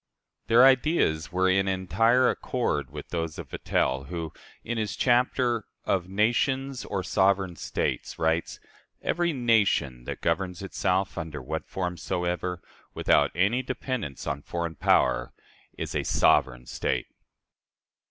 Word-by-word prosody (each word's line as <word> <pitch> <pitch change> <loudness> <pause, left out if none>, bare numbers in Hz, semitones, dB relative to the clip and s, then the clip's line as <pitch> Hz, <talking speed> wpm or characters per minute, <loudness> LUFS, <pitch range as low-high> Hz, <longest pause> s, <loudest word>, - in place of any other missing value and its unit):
Their 120 +3 +7
ideas 130 - +3
were 95 +1 +2
in 95 +1 +2
entire 95 +7 +3
accord 70 -3 -1
with 75 +1 -9
those 80 -2 -3
of - - -8
Vattel, 65 +1 -1
who, 85 -1 -5 0.3
in 120 0 -3
his 110 0 -2
chapter 120 -2 +2 0.2
"Of 95 -2 0
Nations 125 +6 0
or 95 -2 -3
Sovereign 95 -2 +2
States," - - -3
writes, 80 +1 0 0.4
"Every 175 -1 +1
nation 105 - +1
that - - -6
governs 90 +2 -1
itself, 95 -1 -1
under 80 -3 -5
what 65 - -5
form 90 -2 -3
soever, 90 +1 -2 0.3
without - - +3
any 100 +8 +2
dependence 125 - -4
on 70 0 -3
foreign 85 +2 -4
power, 75 - +2 0.4
is - - -4
a - - 0
sovereign 60 -1 +2
state." - - -2
95 Hz, 130 wpm, -27 LUFS, 80-115 Hz, 0.4 s, Their